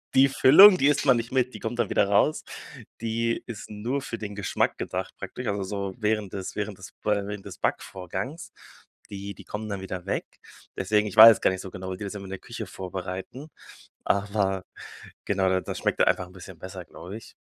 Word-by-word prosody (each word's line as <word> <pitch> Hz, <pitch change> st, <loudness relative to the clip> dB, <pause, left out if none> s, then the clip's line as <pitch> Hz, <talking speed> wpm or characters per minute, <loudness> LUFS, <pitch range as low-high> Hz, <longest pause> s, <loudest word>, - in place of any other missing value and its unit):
die 135 Hz, +1 st, +7 dB
Füllung, 185 Hz, +10 st, +8 dB
die 140 Hz, -, +3 dB
isst 145 Hz, 0 st, +2 dB
man 135 Hz, -4 st, +5 dB
nicht 115 Hz, +1 st, -4 dB
mit, 130 Hz, -1 st, +1 dB
die -, -, -8 dB
kommt 120 Hz, +1 st, -4 dB
dann 115 Hz, -, +1 dB
wieder 100 Hz, -, +2 dB
raus. 100 Hz, +10 st, +2 dB, 0.6 s
Die 115 Hz, +1 st, -1 dB
ist 115 Hz, -3 st, -8 dB
nur 120 Hz, +7 st, -3 dB
für 115 Hz, -4 st, -5 dB
den 105 Hz, -2 st, -6 dB
Geschmack 100 Hz, -1 st, 0 dB
gedacht -, -, -4 dB
praktisch, -, -, -6 dB
also 100 Hz, -1 st, -1 dB
so 100 Hz, 0 st, -4 dB
während 105 Hz, -3 st, -1 dB
des 95 Hz, -2 st, -5 dB
während 105 Hz, -1 st, -3 dB
des 95 Hz, -, -11 dB
während 105 Hz, -1 st, -1 dB
des 100 Hz, -, -9 dB
Backvorgangs. 95 Hz, -, -4 dB, 0.6 s
Die 100 Hz, 0 st, -6 dB
die -, -, -13 dB
kommen 105 Hz, +1 st, -6 dB
dann 100 Hz, -2 st, -4 dB
wieder 95 Hz, -2 st, -6 dB
weg. -, -, -2 dB, 0.5 s
Deswegen, 105 Hz, +2 st, +1 dB
ich 105 Hz, -, -7 dB
weiß 115 Hz, +1 st, +11 dB
es -, -, -20 dB
gar -, -, +3 dB
nicht 95 Hz, -, -4 dB
so 95 Hz, -, -8 dB
genau, 95 Hz, -1 st, -6 dB
wie 95 Hz, -, -5 dB
die 105 Hz, -, -7 dB
das 100 Hz, +1 st, -6 dB
immer 100 Hz, -, -6 dB
in -, -, -9 dB
der 95 Hz, -, -5 dB
Küche -, -, -7 dB
vorbereiten, 95 Hz, -, -7 dB, 0.6 s
aber 100 Hz, -1 st, 0 dB, 0.6 s
genau, 95 Hz, -1 st, +1 dB
da 95 Hz, 0 st, +2 dB
das -, -, -5 dB
schmeckt -, -, -1 dB
einfach 90 Hz, -, +2 dB
'n -, -, -17 dB
bisschen 95 Hz, -1 st, -11 dB
besser, 95 Hz, +1 st, -8 dB
glaube 90 Hz, +5 st, -10 dB
ich. 115 Hz, -, -12 dB
100 Hz, 215 wpm, -26 LUFS, 95-115 Hz, 0.6 s, weiß